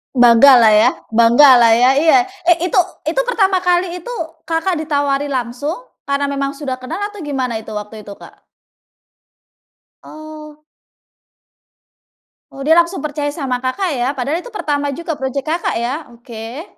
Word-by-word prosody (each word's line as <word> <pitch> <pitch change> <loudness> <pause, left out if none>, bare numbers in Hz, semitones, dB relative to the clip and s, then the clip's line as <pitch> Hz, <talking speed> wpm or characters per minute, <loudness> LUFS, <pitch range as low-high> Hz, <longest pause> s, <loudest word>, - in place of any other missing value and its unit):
Banggalah 240 -1 +6
ya 210 0 +5 0.2
banggalah 235 +1 +6
ya. 245 +2 +4
Iya, 320 +5 +4 0.3
eh 350 -1 +5
itu 360 +1 +1 0.2
itu - - 0
pertama 395 -6 +1
kali 360 0 0
itu 485 +8 -8 0.3
Kakak 325 +1 -1
ditawari 285 -2 -1
langsung 260 +3 -3 0.3
karena 280 0 0
memang 275 0 -3
sudah 270 -3 -5
kenal 300 +8 -6
atau 415 - -12
gimana 260 -7 -3
itu 220 - -11
waktu 210 0 -8
itu, 200 - -8
Kak? - - -16 1.6
Oh. 305 -1 -12 1.9
Oh 275 - -9
dia 320 +4 +4
langsung 340 +1 -1
percaya 295 -1 -3
sama 265 -5 -3
Kakak 265 +9 -2
ya 240 - 0
padahal 275 +6 -2
itu 360 - -11
pertama 290 -1 -2
juga 325 -2 -5
project 265 +1 -3
Kakak 340 +2 -2
ya, 275 +7 -4
oke. 235 +3 -9
285 Hz, 145 wpm, -17 LUFS, 250-325 Hz, 1.9 s, Banggalah